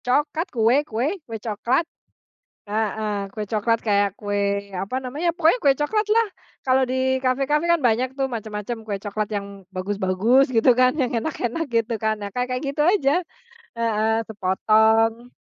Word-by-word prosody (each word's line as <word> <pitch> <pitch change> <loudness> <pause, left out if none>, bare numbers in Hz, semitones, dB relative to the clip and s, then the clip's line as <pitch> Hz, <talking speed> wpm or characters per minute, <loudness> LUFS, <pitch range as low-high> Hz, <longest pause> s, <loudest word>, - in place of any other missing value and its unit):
Coklat. 295 +7 0
Kue 230 +2 +2
kue, 235 +6 -1 0.2
kue 225 - -5
coklat. 235 +8 0 0.8
Heeh. 210 -1 -2
Kue 215 - -4
coklat, 230 +1 +1
kayak 200 -2 +1
kue, 200 -1 -1
apa 200 +8 -3
namanya, 295 +7 -2
pokoknya 340 +7 +3
kue 275 - +6
coklat 425 +8 +1
lah. 460 0 +4 0.4
Kalau 260 0 +3
di 260 +1 0
kafe-kafe 275 +5 +1
kan 340 - +2
banyak 245 +1 +1
tuh, 270 0 -2
macam-macam 220 -1 -5
kue 205 -2 -3
coklat 210 +1 -3
yang 200 -1 -5
bagus-bagus, 200 +7 +1
gitu 230 +2 +4
kan, 255 0 +4
yang 250 -2 0
enak-enak 260 +3 -2
gitu 230 0 +1
kan. 215 0 -1
Nah, 205 - -4
kayak-kayak 250 +2 -2
gitu 295 +2 0
aja. 350 -2 +2 0.5
Heeh. 225 0 +1
Sepotong 220 +4 +2
230 Hz, 150 wpm, -23 LUFS, 210-265 Hz, 0.8 s, kue